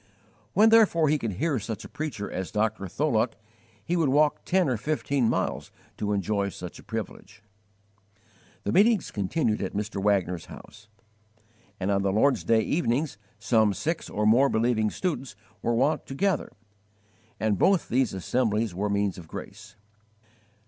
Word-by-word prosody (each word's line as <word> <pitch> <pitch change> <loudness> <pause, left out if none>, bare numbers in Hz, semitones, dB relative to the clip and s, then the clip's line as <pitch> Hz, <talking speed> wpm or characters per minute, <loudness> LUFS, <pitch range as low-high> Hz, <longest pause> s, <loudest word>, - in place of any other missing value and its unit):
When, 215 +4 +6
therefore, 200 -9 +5
he 150 0 +2
could 115 -5 -3
hear 140 - 0
such 110 -1 -6
a - - -7
preacher 150 -10 -5
as 95 0 -4
Dr. 105 -2 -1
Tholuck, 115 - 0 0.5
he 175 - 0
would 165 -5 +2
walk 150 +2 +2
ten 185 -2 +2
or 130 - +1
fifteen 140 -1 0
miles - - -2 0.3
to 105 -1 -2
enjoy 100 0 0
such 90 -2 -9
a - - -14
privilege. 110 -1 -7 1.2
The - - -1
meetings 210 +1 +3
continued 105 - -1
at 95 - -4
Mr. 105 -1 -3
Wagner's 95 -4 +1
house; 100 +1 -13 0.9
and 95 +1 -1
on 100 0 +2
the 100 0 +1
Lord's 130 +7 +2
day 115 -1 +3
evenings 140 - -1 0.2
some 110 -4 +2
six 165 +1 -3
or 105 +1 -1
more 125 +6 +5
believing 110 -1 +1
students 150 - -3 0.3
were 120 - 0
wont 140 +4 +1
to 135 - -6
gather, 190 +1 0 0.9
and 105 -3 0
both 190 -4 +3
these 130 -1 +1
assemblies 110 +2 0
were 100 +4 -2
means 100 -2 0
of 85 - -12
grace. - - -9
115 Hz, 155 wpm, -26 LUFS, 100-150 Hz, 1.2 s, When